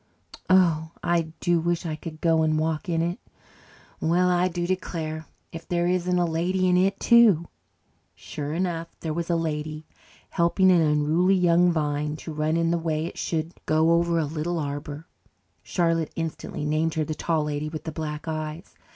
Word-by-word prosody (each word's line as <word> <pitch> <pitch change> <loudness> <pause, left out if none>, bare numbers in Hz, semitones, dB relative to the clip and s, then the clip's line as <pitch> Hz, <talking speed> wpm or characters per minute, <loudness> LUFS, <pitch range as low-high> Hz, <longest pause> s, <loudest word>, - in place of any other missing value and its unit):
Oh, 165 -4 +3
I 170 -2 +1
do 175 -1 +2
wish 170 +1 -1
I 155 -2 -2
could 155 0 -9
go 165 -1 +3
and 155 0 +2
walk 160 +4 -1
in 165 -1 +1
it. 175 +2 -2 0.8
Well, 175 +3 +2
I 180 +1 +3
do 175 -1 -3
declare! 160 -4 -3 0.2
If 165 0 -9
there 175 -1 0
isn't 180 0 +1
a 175 - +2
lady 180 +3 0
in 180 - +3
it, 195 +2 +2
too!" 215 -9 +5 0.7
Sure 125 +10 -6
enough, 170 0 -2
there 160 -2 -2
was 170 +1 -3
a 170 - +2
lady, 155 -1 -3 0.5
helping 180 +2 +3
an 175 -2 +5
unruly 155 +5 +3
young 175 -1 +4
vine 150 -1 -1
to 160 +1 -8
run 155 +2 0
in 165 0 +1
the 170 - +1
way 160 -1 -1
it 170 - -7
should 165 +1 -2
go 160 +1 +3
over 170 0 +2
a 160 - +1
little 160 +3 -3
arbour. 145 +1 -5 0.6
Charlotte 165 -3 0
instantly 165 -2 -4
named 155 +1 0
her 160 - +1
the 155 - -3
Tall 155 0 0
Lady 150 0 -3
with 155 0 -7
the 160 - -5
Black 150 0 -5
Eyes. 155 +2 -5
165 Hz, 180 wpm, -25 LUFS, 155-175 Hz, 0.8 s, too